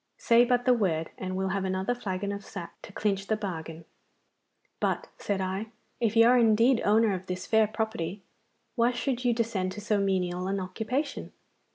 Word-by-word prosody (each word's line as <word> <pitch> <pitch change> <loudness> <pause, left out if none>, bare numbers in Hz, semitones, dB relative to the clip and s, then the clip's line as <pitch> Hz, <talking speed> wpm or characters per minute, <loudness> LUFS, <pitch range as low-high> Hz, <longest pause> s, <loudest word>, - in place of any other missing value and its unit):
Say 235 +1 +5
but 245 0 +1
the 250 - +6
word, 170 -9 0
and 185 0 -4
we'll 190 0 -1
have 195 +1 -1
another 190 +4 -1
flagon 200 -4 -3
of 200 0 -5
sack 175 -4 -8
to - - -11
clinch 195 -1 -1
the 220 - +2
bargain.' 165 -5 -6 0.9
'But,' - - 0
said 200 -2 -1
I, 190 +3 -2 0.3
'if 230 -2 0
you 230 0 +7
are 250 +1 +6
indeed 230 +2 +4
owner 215 0 +4
of 185 0 -5
this 180 0 -4
fair 220 -1 +4
property, 210 -4 -3 0.5
why 240 0 +2
should 250 0 -2
you 245 - +3
descend 220 -6 -1
to 210 - -7
so 210 -1 +1
menial 185 -2 0
an 195 +1 -1
occupation? 225 +10 -3
205 Hz, 185 wpm, -28 LUFS, 185-230 Hz, 0.9 s, you